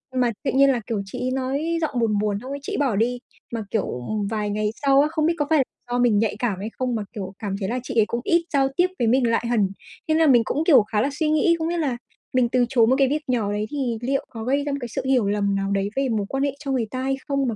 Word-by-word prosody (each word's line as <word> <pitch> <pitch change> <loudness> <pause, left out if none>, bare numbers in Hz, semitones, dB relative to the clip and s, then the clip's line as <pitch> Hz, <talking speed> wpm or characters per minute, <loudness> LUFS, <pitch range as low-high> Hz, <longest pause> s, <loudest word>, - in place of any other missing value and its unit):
mà 250 -2 +2
tự 280 - 0
nhiên 275 +1 +5
là, 245 -3 -1
kiểu, 225 -4 -1
chị 195 - -7
ấy 255 - -1
nói 275 +6 -1
giọng 290 -6 -1
buồn 220 -3 +1
buồn, 205 -1 0
xong 255 - -8
ấy 280 - -4
chị 290 - -5
ấy - - -1
bỏ 270 -7 +1
đi, 240 +4 0 0.3
mà, 230 -2 -3
kiểu, 220 - 0 0.2
ừm, 210 -2 -1
vài 210 -1 -2
ngày 210 +1 0
sau 275 0 +5
á, 295 - +3
không 310 -1 0
biết 335 - +3
có 295 - 0
phải 310 -4 +4 0.3
do 245 - +1
mình 235 -4 +4
nhạy 220 -1 0
cảm 215 -6 -1
hay 210 +3 -4
không, 255 -2 -1
mà, 215 - -2
kiểu, 195 -4 -6
cảm 200 -3 -3
thấy 190 - -2
là 250 +2 -1
chị 255 - -6
ấy 215 - +5
cũng 235 - -2
ít 340 +3 +3
giao 270 -1 +3
tiếp 355 - +4
với 235 - +2
mình 250 +1 +3
lại 230 +1 +1
hẳn. 220 -5 +2 0.4
Thế 315 - +2
là 320 0 +4
mình 245 -4 +6
cũng, 295 +8 -1
kiểu, 265 - +7
khá 210 0 -1
là 275 - +1
suy 310 -2 +2
nghĩ, 310 +2 +3
không 320 - -1
biết 345 +1 -1
là 270 -7 -1 0.4
mình 250 -2 +3
từ 250 0 +2
chối 235 -3 +4
một 255 - +4
cái 270 - +5
việc 300 +3 -1
nhỏ 230 -5 0
đấy 210 +1 -1
thì 260 -6 -1
liệu 270 +3 -1
có 225 -2 -7
gây 275 +4 +1
ra 290 - -2
một 280 - -1
cái 245 - -4
sự 255 +4 -3
hiểu 255 -6 +2
lầm 200 -1 +1
nào 195 0 -1
đấy 200 0 0
về 270 -1 0
mối 215 -3 0
quan 270 0 -1
hệ 280 - +1
cho 280 -2 -4
người 250 -4 +1
ta 255 - -3
hay 270 0 0
không, 275 -2 0
mà, 230 - -1
250 Hz, 310 wpm, -23 LUFS, 220-275 Hz, 0.4 s, kiểu